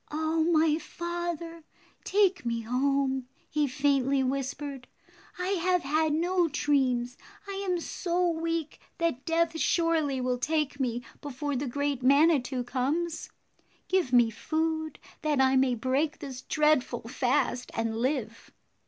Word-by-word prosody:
"Oh, 315 Hz, +1 st, 0 dB
my 320 Hz, -1 st, +3 dB
father, 340 Hz, 0 st, -5 dB, 0.4 s
take 390 Hz, -2 st, +2 dB
me 235 Hz, -1 st, -1 dB
home," 265 Hz, +2 st, 0 dB, 0.2 s
he 300 Hz, -1 st, +1 dB
faintly 275 Hz, 0 st, +2 dB
whispered. 275 Hz, 0 st, -3 dB, 0.5 s
"I 360 Hz, +1 st, -2 dB
have 365 Hz, -2 st, +1 dB
had 310 Hz, +3 st, +1 dB
no 345 Hz, +3 st, +2 dB
dreams. 260 Hz, -5 st, 0 dB, 0.3 s
I 395 Hz, 0 st, -4 dB
am 355 Hz, -1 st, +1 dB
so 350 Hz, +1 st, -1 dB
weak 330 Hz, -1 st, -2 dB, 0.2 s
that 335 Hz, -7 st, -1 dB
death 330 Hz, 0 st, +1 dB
surely 320 Hz, -6 st, +1 dB
will 250 Hz, -1 st, -1 dB
take 300 Hz, 0 st, -1 dB
me 245 Hz, -2 st, -1 dB, 0.2 s
before 290 Hz, 0 st, -3 dB
the 270 Hz, +2 st, -2 dB
great 285 Hz, +1 st, -1 dB
Manitou 275 Hz, -2 st, +3 dB
comes. 305 Hz, +7 st, -2 dB, 0.6 s
Give 370 Hz, -9 st, +1 dB
me 240 Hz, -2 st, +5 dB
food 315 Hz, +5 st, -2 dB, 0.2 s
that 305 Hz, -3 st, +1 dB
I 265 Hz, 0 st, +4 dB
may 260 Hz, -1 st, +3 dB
break 260 Hz, +6 st, 0 dB
this 260 Hz, -3 st, -7 dB
dreadful 300 Hz, -6 st, +1 dB
fast 250 Hz, +1 st, 0 dB
and 225 Hz, -1 st, -1 dB
live." 235 Hz, -2 st, -2 dB
290 Hz, 130 wpm, -28 LUFS, 255-330 Hz, 0.6 s, me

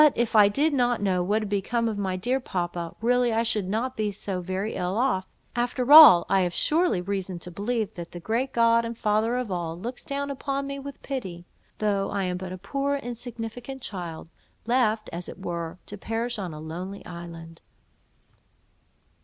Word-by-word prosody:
If 235 Hz, -1 st, 0 dB
I 205 Hz, -2 st, +8 dB
did 290 Hz, +7 st, +1 dB
but 245 Hz, -2 st, +2 dB
know 190 Hz, -3 st, +1 dB
what 210 Hz, +5 st, +1 dB
had 210 Hz, -, -5 dB
become 230 Hz, +4 st, 0 dB
of 220 Hz, -, -1 dB
my 195 Hz, -2 st, -2 dB
dear 245 Hz, +8 st, 0 dB
papa, 175 Hz, -7 st, -4 dB
really 245 Hz, +1 st, +3 dB
I 225 Hz, +1 st, +2 dB
should 210 Hz, -5 st, -1 dB
not 240 Hz, +5 st, -1 dB
be 215 Hz, -1 st, -1 dB
so 195 Hz, -2 st, -4 dB
very 190 Hz, +4 st, -3 dB
ill 180 Hz, +3 st, -2 dB
off, 235 Hz, -7 st, +1 dB, 0.3 s
after 245 Hz, +2 st, 0 dB
all; 300 Hz, -, +11 dB
I 195 Hz, -1 st, +3 dB
have 175 Hz, -1 st, -1 dB
surely 320 Hz, -, +2 dB
reason 190 Hz, -1 st, -3 dB
to 175 Hz, +1 st, -6 dB
believe 215 Hz, +3 st, -2 dB
that 170 Hz, -1 st, -7 dB
the 175 Hz, -, -7 dB
great 230 Hz, +8 st, -1 dB
God 230 Hz, 0 st, +4 dB
and 230 Hz, 0 st, -5 dB
Father 220 Hz, +3 st, +1 dB
of 250 Hz, -5 st, -3 dB
all 170 Hz, -2 st, -3 dB
looks 240 Hz, +6 st, -6 dB
down 280 Hz, 0 st, -3 dB
upon 275 Hz, 0 st, -3 dB
me 275 Hz, 0 st, -5 dB
with 280 Hz, 0 st, -9 dB
pity, 190 Hz, -11 st, -5 dB, 0.3 s
though 200 Hz, -2 st, 0 dB
I 200 Hz, -1 st, -1 dB
am 180 Hz, -1 st, -1 dB
but 185 Hz, 0 st, -6 dB
a 185 Hz, -, -5 dB
poor 275 Hz, +9 st, -1 dB
insignificant 245 Hz, 0 st, -6 dB
child, 175 Hz, -5 st, -6 dB, 0.4 s
left 225 Hz, -3 st, +2 dB
(as 175 Hz, +1 st, -5 dB
it -, -, -9 dB
were) 170 Hz, -2 st, -4 dB
to 205 Hz, -, -8 dB
perish 230 Hz, +2 st, -2 dB
on 185 Hz, -4 st, -4 dB
a 155 Hz, -, -8 dB
lonely 175 Hz, +5 st, -7 dB
island." 170 Hz, -1 st, -9 dB
210 Hz, 190 wpm, -26 LUFS, 180-245 Hz, 0.4 s, all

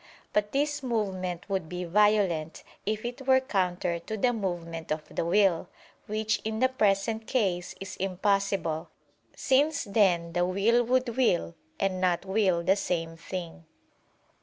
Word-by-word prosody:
But 210 Hz, 0 st, +1 dB
this 290 Hz, +1 st, 0 dB
movement 190 Hz, -8 st, -2 dB
would 190 Hz, -5 st, -2 dB
be 180 Hz, 0 st, -4 dB
violent, 185 Hz, -4 st, +2 dB, 0.2 s
if 215 Hz, +1 st, -1 dB
it 245 Hz, +3 st, -6 dB
were 260 Hz, 0 st, +6 dB
counter 180 Hz, -8 st, -1 dB
to 220 Hz, +6 st, -5 dB
the 245 Hz, +4 st, +2 dB
movement 170 Hz, -6 st, -4 dB
of 155 Hz, 0 st, -2 dB
the -, -, -1 dB
will: 180 Hz, -1 st, +2 dB, 0.4 s
which 215 Hz, 0 st, -1 dB
in 220 Hz, 0 st, -2 dB
the 260 Hz, +3 st, +3 dB
present 220 Hz, -2 st, +1 dB
case 185 Hz, -8 st, 0 dB
is 195 Hz, 0 st, -7 dB
impossible; 195 Hz, -3 st, 0 dB, 0.5 s
since 285 Hz, +3 st, +2 dB
then 190 Hz, -6 st, +2 dB
the 175 Hz, 0 st, +2 dB
will 200 Hz, +7 st, +3 dB
would 255 Hz, +1 st, +2 dB
will 205 Hz, -10 st, +2 dB, 0.3 s
and 190 Hz, -2 st, 0 dB
not 180 Hz, 0 st, +1 dB
will 190 Hz, -3 st, +2 dB
the 190 Hz, +3 st, +4 dB
same 165 Hz, -4 st, -2 dB
thing. 170 Hz, +1 st, -7 dB
195 Hz, 145 wpm, -28 LUFS, 175-220 Hz, 0.5 s, were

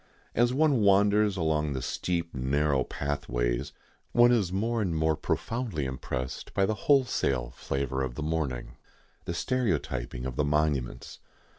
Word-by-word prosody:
As 120 Hz, +1 st, +3 dB
one 140 Hz, -2 st, +3 dB
wanders 100 Hz, 0 st, +4 dB
along 75 Hz, -3 st, 0 dB
the 65 Hz, -, -3 dB
steep, 85 Hz, -2 st, -2 dB
narrow 70 Hz, +1 st, +1 dB
pathways 70 Hz, -2 st, -2 dB, 0.4 s
one 120 Hz, 0 st, +6 dB
is 105 Hz, -7 st, +2 dB
more 115 Hz, +4 st, 0 dB
and 90 Hz, -5 st, -1 dB
more 80 Hz, 0 st, +2 dB
profoundly 105 Hz, -, -2 dB
impressed 65 Hz, 0 st, -5 dB
by 100 Hz, -, +3 dB
the 110 Hz, -, 0 dB
wholesale 95 Hz, -, +1 dB
flavour 65 Hz, 0 st, -2 dB
of 65 Hz, -2 st, -3 dB
the 75 Hz, -, -4 dB
mourning, 75 Hz, -6 st, -3 dB, 0.5 s
the 85 Hz, -, -3 dB
stereotyping 80 Hz, -, -1 dB
of 65 Hz, -1 st, -5 dB
the 75 Hz, -, +2 dB
monuments. 75 Hz, -4 st, -1 dB
75 Hz, 140 wpm, -28 LUFS, 65-105 Hz, 0.5 s, one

